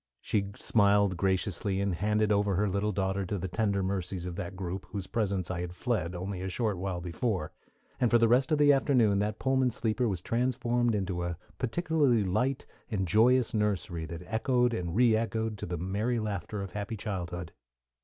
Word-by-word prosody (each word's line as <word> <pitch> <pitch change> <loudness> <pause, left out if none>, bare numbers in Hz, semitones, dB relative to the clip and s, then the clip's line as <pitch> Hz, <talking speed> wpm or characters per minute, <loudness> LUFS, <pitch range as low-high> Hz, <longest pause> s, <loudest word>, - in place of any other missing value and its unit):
She 100 -2 -1
smiled 100 -2 +3
graciously, 95 +1 0
and 100 -1 0
handed 105 +4 +1
over 100 -1 +2
her 105 +3 +2
little 100 +2 0
daughter 95 0 -1
to 100 - -2
the 95 +1 -3
tender 100 0 0
mercies 95 -1 -3
of 90 -1 -5
that 90 +2 -5
group 95 0 -5
whose 100 -2 -5
presence 100 -6 -1
I 85 -1 -3
had 90 0 -5
fled 100 -6 -1
only 95 +1 -4
a 95 - -3
short 105 -2 -1
while 95 -2 -3
before 90 0 -2 0.5
and 120 - +3
for 120 - +5
the 115 0 +4
rest 125 +5 +3
of 155 - +4
the 145 -1 +6
afternoon 125 -7 +3
that 105 +1 -1
Pullman 130 -1 +2
sleeper 115 +1 0
was 95 -5 -1
transformed 120 -1 +1
into 95 -3 -2
a 85 -1 -3 0.2
particularly 140 - +2
bright 125 +8 0 0.2
and 95 -5 -1
joyous 120 +6 +4
nursery 100 -6 -1
that 85 +2 -7
echoed 120 +3 +1
and 90 -2 -3
reëchoed 110 -2 +2
to - - -5
the 90 0 -3
merry 100 +8 -1
laughter 105 -1 -3
of 95 - -7
happy 105 +3 -4
childhood. 90 -4 -4
100 Hz, 185 wpm, -30 LUFS, 95-115 Hz, 0.5 s, the